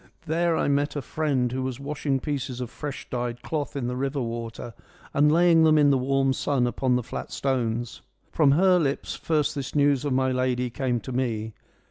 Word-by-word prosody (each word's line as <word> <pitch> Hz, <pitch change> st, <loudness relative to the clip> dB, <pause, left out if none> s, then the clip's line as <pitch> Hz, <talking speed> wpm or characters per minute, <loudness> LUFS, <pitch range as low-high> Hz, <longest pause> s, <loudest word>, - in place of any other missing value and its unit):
There 165 Hz, +1 st, +1 dB
I -, -, +1 dB
met 145 Hz, +1 st, +1 dB
a 145 Hz, -, -2 dB
friend 135 Hz, -6 st, 0 dB
who 130 Hz, +1 st, -2 dB
was 130 Hz, -1 st, -3 dB
washing 140 Hz, -1 st, -2 dB
pieces 135 Hz, -4 st, -3 dB
of 125 Hz, -2 st, -5 dB
fresh 145 Hz, -2 st, -6 dB
dyed 120 Hz, -1 st, -4 dB
cloth 150 Hz, -3 st, -3 dB
in 135 Hz, -3 st, -2 dB
the 125 Hz, +1 st, -2 dB
river 135 Hz, +2 st, -2 dB
water 115 Hz, -1 st, -5 dB, 0.4 s
and 150 Hz, +1 st, +4 dB
laying 165 Hz, 0 st, +5 dB
them 155 Hz, -1 st, +5 dB
in 145 Hz, -1 st, +5 dB
the 135 Hz, -, +4 dB
warm 135 Hz, +1 st, +1 dB
sun 130 Hz, -2 st, 0 dB
upon 125 Hz, +1 st, 0 dB
the 125 Hz, -, 0 dB
flat -, -, -6 dB
stones. 120 Hz, -3 st, -2 dB, 0.3 s
From 145 Hz, -4 st, +4 dB
her 180 Hz, +3 st, +4 dB
lips 140 Hz, -4 st, -1 dB
first 155 Hz, -2 st, 0 dB
this 140 Hz, -3 st, -5 dB
news 145 Hz, -2 st, +3 dB
of 145 Hz, -, -1 dB
my 130 Hz, 0 st, +2 dB
lady 125 Hz, -1 st, 0 dB
came 125 Hz, -1 st, -1 dB
to 130 Hz, -, -7 dB
me.' 115 Hz, -4 st, -2 dB
135 Hz, 200 wpm, -25 LUFS, 125-145 Hz, 0.4 s, laying